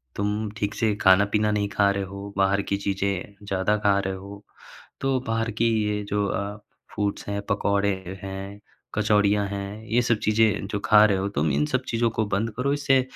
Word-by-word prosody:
तुम 105 +1 -1
ठीक 105 -1 -2
से 110 -2 +1
खाना-पीना 100 +3 +4
नहीं 105 -1 0
खा 100 0 +3
रहे 100 0 -2
हो, 100 +1 -8
बाहर 95 +1 +3
की 100 0 -2
चीज़ें 100 0 -2
ज़्यादा 95 +2 +1
खा 100 -1 +5
रहे 95 -1 -2
हो। 100 +2 -10 0.6
तो 135 -1 +1
बाहर 115 +1 0
की 115 - +4 0.2
ये 105 0 -1
जो 105 0 +1
अ, 100 +1 -3 0.4
फूड्स 105 -1 -2
हैं, 100 0 -2
पकौड़े 100 0 +1 0.3
हैं, 95 +1 -6 0.4
कचौड़ियाँ 105 -1 +3
हैं, 100 +2 -6
ये 115 +2 +2
सब 115 -2 +2
चीज़ें 110 -2 +2
जो 105 - -1
खा 105 0 +7
रहे 100 -2 +2
हो 95 +1 -1
तुम, 75 -5 0
इन 70 +2 +1
सब 130 0 -1
चीज़ों 115 0 +1
को 110 0 0
बंद 110 +3 -1
करो। 140 +3 +1
इससे 135 -2 +3
100 Hz, 190 wpm, -25 LUFS, 100-110 Hz, 0.6 s, खा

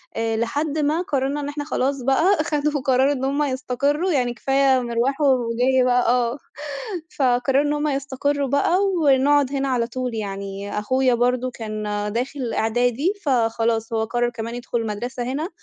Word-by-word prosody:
آآ 225 0 -1
لحد 285 +7 -1
ما 305 +3 +1
قرّرنا 280 -3 -1
إن 285 - -4
إحنا 290 0 -4
خلاص 275 -2 -1
بقى 310 +7 +3
خدوا 300 -2 -1
قرار 260 +1 +3
إن 265 -2 -2
هم 280 +2 0
يستقرّوا، 285 +5 0
يعني 250 -5 +1
كفاية 270 +1 +2
مِرواح 245 +4 -1
ومِجِي 255 -1 +2
بقى 250 -1 +2
آه، 245 +1 +1 0.8
فقرّروا 265 +1 +2
إن 295 0 0
هم 295 +1 -1
يستقرّوا 280 0 -1
بقى 285 +7 +2 0.2
ونقعد 280 0 +4
هنا 275 0 0
على 240 -3 0
طول. 250 0 -4
يعني 200 -1 -4
أخويا 255 +4 +2
برضه 250 +1 +1
كان 215 -2 -5 0.3
داخل 250 +1 -3
إعدادي، 245 - +1
فخلاص 225 -3 +1
هو 220 -1 +1
قرّر 240 +2 0
كمان 230 0 -6
يدخُل 240 -1 -3
مدرسة 240 +4 -4
هنا، 280 +7 -3
255 Hz, 155 wpm, -22 LUFS, 235-285 Hz, 0.8 s, ونقعد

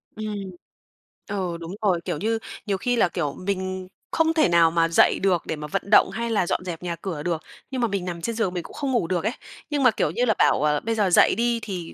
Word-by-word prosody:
Ừm. 215 -1 -4 0.9
Ờ, 185 -4 -3
đúng 165 0 -8
rồi, 185 -5 +2
kiểu - - -2
như, 225 +7 0 0.3
nhiều 200 -3 0
khi 245 +5 0
là, 225 - +3
kiểu, 150 -6 -2
mình 185 0 -3 0.2
không 325 0 +2
thể 315 - +3
nào 170 -1 +5
mà 165 0 +3
dậy 165 - +4
được 185 -3 +2
để - - -2
mà 150 0 -7
vận - - -1
động - - +7
hay 235 +1 -3
là 205 -5 +1
dọn 185 - -1
dẹp 175 -2 -6
nhà 175 -1 -2
cửa 165 -3 -5
được, 170 -2 -1 0.3
nhưng 260 -2 -2
mà 235 - +3
mình 195 -3 -2
nằm 170 -2 -5
trên 230 +6 -2
giường 195 -6 0
mình 175 -2 -3
cũng - - -12
không 275 -2 -2
ngủ 235 -10 +1
được 180 -1 -1
ấy, 220 - 0 0.4
nhưng 290 -2 0
mà, 250 - +6
kiểu 155 - 0
như 245 +8 +1
là, 220 - +3
bảo, - - +3
ờ, 150 -1 +2
bây 225 0 -1
giờ 205 -3 +2
dậy 175 - +5
đi 235 0 +1
thì 180 -6 -6
185 Hz, 260 wpm, -24 LUFS, 170-225 Hz, 0.9 s, động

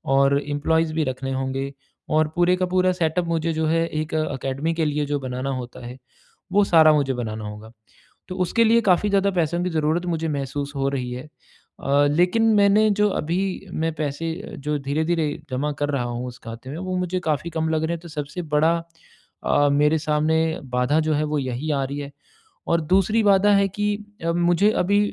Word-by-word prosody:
और 140 +1 +4
एम्प्लॉइज़ 155 +2 0
भी 160 0 +1
रखने 135 0 -3
होंगे 135 +1 -3 0.4
और 155 0 +3
पूरे 175 +1 +3
का 185 0 0
पूरा 185 0 +2
सेटअप 170 0 0
मुझे 165 0 0
जो 160 0 -1
है, 165 +1 +2
एक 155 0 -4
अकेडमी 145 0 -2
के 165 -1 0
लिए 150 0 0
जो 145 0 -1
बनाना 130 0 -4
होता 125 -1 -7
है, 125 +1 -8 0.5
वो 205 +2 +4
सारा 160 -4 +6
मुझे 140 -3 +1
बनाना 110 -3 -4
होगा। 105 +1 -9 0.6
तो 185 - -6
उसके 230 +6 +2
लिए 230 +1 +4
काफ़ी 200 0 +3
ज़्यादा 200 0 +2
पैसों 170 -1 0
की 180 - -1
ज़रूरत 160 +1 0
मुझे 165 -1 -1
महसूस 140 -1 -3
हो 135 0 0
रही 130 -3 -3
है। 125 +1 -6 0.6
अ, 140 +1 +3
लेकिन 180 +8 +2
मैंने 205 +1 +5
जो 210 0 +4
अभी 170 +4 -1 0.3
मैं 160 0 -1
पैसे, 155 +2 -3 0.3
जो 150 +1 -1
धीरे-धीरे 155 +4 0 0.2
जमा 140 +4 -1
कर 145 - +1
रहा 140 -4 0
हूँ 120 +1 -4
उस 125 0 -9
खाते 115 +3 -8
में, 150 - -6
वो 185 +1 -3
मुझे 180 0 -1
काफ़ी 155 +3 -1
कम 160 -1 -1
लग 160 0 0
रहे 160 +1 0
हैं, 170 - -4
तो 170 - -11
सबसे 150 +3 -5
बड़ा 160 +3 +4 0.7
अ, 145 0 +3
मेरे 150 +2 +3
सामने 155 +1 +1 0.4
बाधा 125 +5 +2
जो 155 - +2
है, 150 +1 +1
वो 150 0 -1
यही 130 +3 -3
आ 140 -2 0
रही 140 +2 -5
है 140 0 -6 0.6
और 170 0 +2
दूसरी 195 +7 +2
बाधा 200 0 +5
है 200 0 +3
कि 205 +2 -1 0.3
अ, 165 - +1
मुझे 175 +4 +3
अभी 200 +3 +3
155 Hz, 200 wpm, -23 LUFS, 140-175 Hz, 0.7 s, सारा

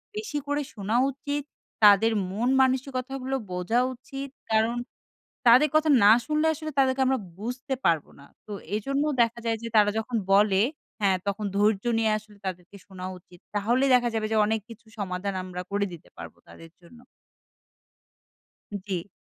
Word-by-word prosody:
বেশি 425 -9 -4
করে 290 +1 0
শোনা 210 +1 -3 0.2
উচিত। 285 +1 -4 0.4
তাদের 210 +2 +7 0.2
মন 230 +6 0
মানসিকতাগুলো 260 0 -1 0.2
বোঝা 180 +7 0
উচিত। 270 +2 -8 0.2
কারণ 220 +2 +2 0.7
তাদের 255 +6 +7
কথা 310 0 +3 0.2
না 205 - +8 0.2
শুনলে 305 +1 +1
আসলে 310 0 -6
তাদেরকে 265 0 +3
আমরা 265 0 +2 0.2
বুঝতে 250 +5 -4
পারব 165 -4 +3 0.2
না। - - -14 0.2
তো 210 - -8 0.2
এজন্য 275 +7 -1 0.2
দেখা 230 0 -1
যায় 225 0 +1
যে 230 - -4
তারা 205 -1 +5
যখন 230 +2 -3 0.2
বলে 200 -1 +4 0.4
হ্যাঁ 195 -2 +3
তখন 200 +1 -2
ধৈর্য 205 0 +2
নিয়ে 220 -1 +2
আসলে 210 -1 -18
তাদেরকে 180 +1 -6
শোনা 185 -2 -9
উচিত। 175 0 -19 0.2
তাহলেই 240 +6 +2
দেখা 245 -1 +4
যাবে 220 -1 0
যে 220 - +2
অনেক 220 0 0
কিছু 230 0 -13
সমাধান 190 0 -3
আমরা 180 0 -6
করে 200 0 0
দিতে 165 - -12
পারবো - - -10
তাদের 165 0 -13
জন্য। 175 +8 -17 1.9
জি। 185 -1 -3
225 Hz, 155 wpm, -26 LUFS, 200-260 Hz, 1.9 s, না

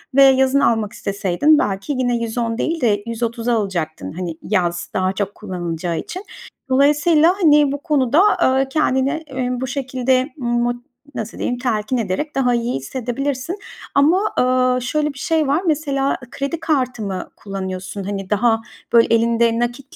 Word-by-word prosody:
ve 275 - +8
yazın 265 +1 +5
almak 220 -5 +1
isteseydin 200 - +2
belki 195 +6 -2
yine 245 -2 +1
110 230 0 -2
değil 325 +1 -1
de 205 -4 +2
130'a 230 +1 -2
alacaktın, 165 - -3
hani, 170 -2 -5
yaz 175 -4 -1
daha 185 0 0
çok 200 0 -3
kullanılacağı 175 -4 -4
için. 370 +3 -7 0.5
Dolayısıyla, 300 +5 +4
hani, 295 -3 +5
bu 285 - -2
konuda, 295 0 +3 0.2
aaa, 265 +1 +2
kendini, 270 -2 +1 0.2
emm, 250 -2 -3
bu 260 - -2
şekilde 260 0 0
mot 240 -1 0 0.4
nasıl 220 +1 -5
diyeyim, 245 - -2
telkin 240 -1 -1
ederek 230 +9 -2
daha 250 -2 +2
iyi 235 0 -1
hissedebilirsin 260 - -3 0.4
ama, 340 +9 +3
aaa, 255 0 +3
şöyle 300 +4 -1
bir 275 - -11
şey 320 -3 +1
var. 295 +6 +2
Mesela, 280 -3 0
ı 240 - -27
kredi 280 +4 -3
kartı 260 -8 -1
mı 190 -2 -4
kullanıyorsun? 190 0 -5
Hani, 195 -1 -5
daha, 225 +2 +2 0.3
böyle, 230 0 +5
elinde 230 0 +2
nakit 245 +3 -4
245 Hz, 155 wpm, -20 LUFS, 210-275 Hz, 0.5 s, ve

